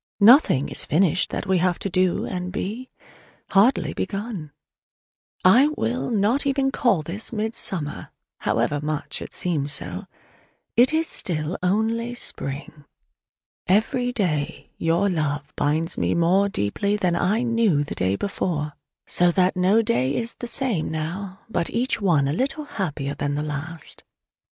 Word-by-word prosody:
Nothing 210 Hz, -, +6 dB
is -, -, 0 dB
finished 180 Hz, +1 st, +2 dB
that -, -, -4 dB
we 190 Hz, -2 st, +2 dB
have 180 Hz, 0 st, +1 dB
to -, -, -3 dB
do 185 Hz, -1 st, +1 dB
and 180 Hz, -1 st, -4 dB
be: 220 Hz, +7 st, -4 dB, 0.6 s
hardly 215 Hz, +6 st, +3 dB
begun! 195 Hz, -7 st, -4 dB, 0.9 s
I 245 Hz, +10 st, +7 dB
will 245 Hz, +3 st, -1 dB
not 225 Hz, +4 st, +2 dB, 0.3 s
call 205 Hz, -10 st, +2 dB
even -, -, -11 dB
this 200 Hz, +7 st, -2 dB
"midsummer," 210 Hz, -8 st, -3 dB, 0.3 s
however 145 Hz, -, 0 dB
much 150 Hz, 0 st, -4 dB
it -, -, -7 dB
seems 150 Hz, -5 st, 0 dB
so: 90 Hz, -8 st, -2 dB, 0.7 s
it 245 Hz, +4 st, +5 dB
is 320 Hz, +1 st, +1 dB
still 160 Hz, -, -2 dB
only 225 Hz, +6 st, 0 dB
spring. 145 Hz, -, -3 dB, 0.8 s
Every 245 Hz, +6 st, +2 dB
day 165 Hz, -9 st, -2 dB
your 170 Hz, +4 st, +2 dB
love 150 Hz, -5 st, -2 dB
binds 160 Hz, +4 st, 0 dB
me -, -, +1 dB
more 185 Hz, +4 st, +3 dB
deeply 200 Hz, -, -1 dB
than 180 Hz, -4 st, +1 dB
I 200 Hz, +7 st, +1 dB
knew 230 Hz, -11 st, +2 dB
the 145 Hz, -, -6 dB
day 95 Hz, +2 st, 0 dB
before: 150 Hz, -, -2 dB, 0.3 s
so 175 Hz, 0 st, +3 dB
that 185 Hz, +2 st, +2 dB
no 190 Hz, +5 st, +3 dB
day 140 Hz, -, +1 dB
is 235 Hz, 0 st, -2 dB
the 240 Hz, -, -7 dB
same 235 Hz, -, -1 dB
now, 185 Hz, +5 st, -5 dB
but 195 Hz, -6 st, 0 dB
each 240 Hz, 0 st, -1 dB
one 160 Hz, -8 st, +3 dB
a 140 Hz, -, 0 dB
little 275 Hz, -, -1 dB
happier 150 Hz, -, -3 dB
than 145 Hz, 0 st, -2 dB
the 150 Hz, -, -2 dB
last. 155 Hz, +2 st, -6 dB
185 Hz, 145 wpm, -23 LUFS, 155-220 Hz, 0.9 s, I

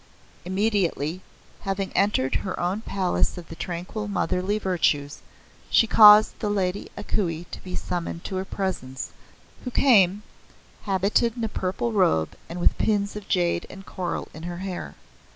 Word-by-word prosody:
Immediately, 185 Hz, -4 st, 0 dB, 0.4 s
having 195 Hz, 0 st, -3 dB
entered 190 Hz, -10 st, +2 dB
her 190 Hz, -, -4 dB
own 185 Hz, +5 st, -1 dB
palace 190 Hz, -4 st, 0 dB
of 170 Hz, -2 st, -9 dB
the 165 Hz, -, -8 dB
Tranquil 180 Hz, +5 st, -5 dB
Motherly 195 Hz, +1 st, 0 dB
Virtues, 160 Hz, -7 st, 0 dB, 0.5 s
she -, -, +5 dB
caused 215 Hz, -1 st, +7 dB
the 210 Hz, -, -1 dB
Lady 195 Hz, -1 st, -1 dB
A -, -, -5 dB
Kuei 170 Hz, -6 st, -1 dB
to -, -, -8 dB
be 185 Hz, -, -6 dB
summoned 170 Hz, -1 st, -4 dB
to 190 Hz, -, -4 dB
her 185 Hz, -, -1 dB
presence, 140 Hz, -10 st, -4 dB, 0.5 s
who 250 Hz, -, -3 dB
came, 210 Hz, -7 st, +4 dB, 0.6 s
habited 205 Hz, +4 st, +1 dB
in 235 Hz, -, -3 dB
a -, -, +1 dB
purple 190 Hz, +3 st, -2 dB
robe 80 Hz, -, +2 dB
and 170 Hz, +2 st, -6 dB
with 175 Hz, -, +2 dB
pins 205 Hz, -2 st, +1 dB
of 210 Hz, -2 st, -7 dB
jade 175 Hz, -2 st, +1 dB
and 195 Hz, 0 st, -11 dB
coral 180 Hz, -1 st, -4 dB
in 155 Hz, -, -10 dB
her 175 Hz, +1 st, -5 dB
hair. 180 Hz, -, -5 dB
190 Hz, 155 wpm, -25 LUFS, 175-205 Hz, 0.6 s, caused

